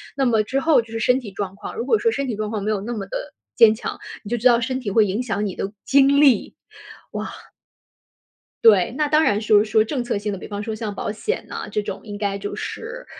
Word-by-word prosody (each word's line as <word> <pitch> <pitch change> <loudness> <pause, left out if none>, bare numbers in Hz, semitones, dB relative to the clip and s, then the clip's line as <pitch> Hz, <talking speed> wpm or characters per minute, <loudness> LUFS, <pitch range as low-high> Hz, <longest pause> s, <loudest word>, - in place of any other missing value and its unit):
那 275 - 0
么 225 -4 +3
之 270 +5 -1
后 300 -6 +3
就 230 - -16
是 225 - -2
身 250 +4 +3
体 215 -6 -9
状 195 -1 -5
况， - - -8
如 230 - -3
果 435 - +3
说 460 +1 +1
身 275 -6 -2
体 230 - -2
状 215 +1 -3
况 210 -2 -2
没 210 - -2
有 210 -2 0
那 235 +3 -4
么 195 -3 -5
的 - - -6 0.2
坚 220 -1 +7
强， 220 - -5 0.3
你 205 - -8
就 240 - 0
知 235 - +4
道 240 -1 +4
身 260 +2 -2
体 210 -6 -4
会 220 +1 +5
影 210 +7 -2
响 210 -3 -2
你 195 -3 -3
的 200 +2 -4
精 280 +1 +4
力。 265 -8 +4 0.8
哇。 - - -14 1.1
对， 210 -2 +6
那 300 0 +1
当 305 +2 +3
然 210 -3 +2
说 210 -1 +4
说 215 0 +3
政 250 +1 -3
策 240 -4 -2
性 205 0 -3
的， 195 - -4
比 - - -9
方 205 0 -5
说 220 0 -4
像 215 -2 -4
保 205 - -3
险 225 - -3
啊， - - -5
这 210 - -2
种 200 -2 -5
应 205 -2 -7
该 200 -1 -2
就 205 +1 -5
是， - - -6
220 Hz, 275 characters per minute, -22 LUFS, 205-255 Hz, 1.1 s, 坚